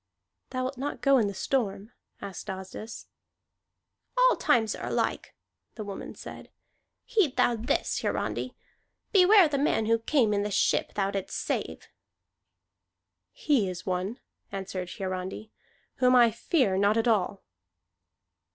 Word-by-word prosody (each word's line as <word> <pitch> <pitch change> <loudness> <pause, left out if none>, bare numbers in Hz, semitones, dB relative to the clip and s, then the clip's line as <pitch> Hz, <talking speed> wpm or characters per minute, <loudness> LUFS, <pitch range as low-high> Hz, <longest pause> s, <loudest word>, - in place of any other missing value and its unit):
"Thou 255 0 -2
wilt 255 0 -4
not 285 +2 -4
go 275 -2 +5
in 215 - +2
the 200 - -4
storm?" 215 -4 -2 0.3
asked 195 -3 -7
Asdis. 190 +4 -7 1.1
"All - - +5
times 225 -3 +2
are - - -6
alike," - - -2 0.4
the 220 - -5
woman 200 -1 -7
said. - - -10 0.6
"Heed 420 - +1
thou 240 - +3
this, 225 +1 -1
Hiarandi. - - -2 0.6
Beware 390 -1 +7
the 285 -2 -1
man 275 -6 +1
who 230 +1 +2
came 230 -2 +2
in 200 - +1
the 205 - -2
ship 200 - +1
thou 195 -1 0
didst 195 -2 -4
save!" - - -3 1.4
"He 290 - +1
is 180 0 -7
one," 185 +6 -2 0.3
answered 190 -2 -5
Hiarandi, 190 +3 -5 0.5
"whom 255 0 +4
I 240 -2 +6
fear 230 - +1
not 205 +2 +3
at 225 - +1
all." 200 -3 +1
220 Hz, 135 wpm, -28 LUFS, 195-265 Hz, 1.4 s, Beware